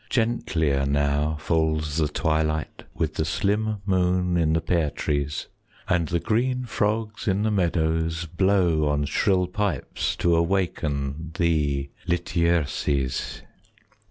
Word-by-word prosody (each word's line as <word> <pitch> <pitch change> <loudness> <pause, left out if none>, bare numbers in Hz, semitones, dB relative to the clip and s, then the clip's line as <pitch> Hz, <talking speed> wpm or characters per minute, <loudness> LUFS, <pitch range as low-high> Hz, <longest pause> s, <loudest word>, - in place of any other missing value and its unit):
10 120 -1 +1
Gentlier 70 -4 0
now 70 +2 +1
falls 80 -2 0
the 80 -2 +2
twilight, 80 0 -1
With 80 -1 -1
the - - -1
slim 105 +5 0
moon 90 -2 +1
in 80 -2 +2
the 80 - +3
pear 80 -2 +1
trees; 70 0 -2 0.4
And 85 -3 +1
the 85 +1 0
green 125 +5 0
frogs 110 0 -1
in 100 +1 +2
the 110 - +1
meadows 80 -3 0
Blow 85 -3 +2
on 75 0 +1
shrill 90 +5 +2
pipes 90 - -2
to 85 -1 +2
awaken 80 -4 -1
Thee, 75 -5 +1 0.2
Lityerses. 85 -6 0
85 Hz, 125 wpm, -25 LUFS, 75-95 Hz, 0.4 s, the